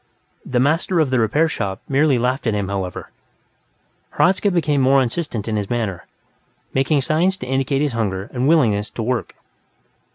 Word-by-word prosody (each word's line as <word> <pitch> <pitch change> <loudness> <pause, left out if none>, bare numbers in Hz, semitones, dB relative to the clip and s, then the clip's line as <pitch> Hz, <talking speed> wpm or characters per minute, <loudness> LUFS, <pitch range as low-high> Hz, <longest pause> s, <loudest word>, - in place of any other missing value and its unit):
The 125 - -1
master 165 +6 +1
of 150 -5 +1
the 130 - +2
repair 145 +9 +2
shop 100 -11 -3
merely 140 -1 +3
laughed 125 +2 -1
at 110 - +1
him, 100 -2 -2
however. 95 -3 -4 1.1
Hradzka 190 +3 +3
became 155 -6 +1
more 135 +1 +4
insistent 125 - -2
in 110 -1 -1
his 100 -2 -3
manner, 110 -7 -3 0.7
making 135 +2 +2
signs 170 +7 +1
to 185 - -7
indicate 135 +2 0
his 145 - 0
hunger 100 -4 -2
and 130 +1 0
willingness 115 -10 +2
to 115 - -5
work. 125 +1 -2
130 Hz, 165 wpm, -20 LUFS, 110-150 Hz, 1.1 s, more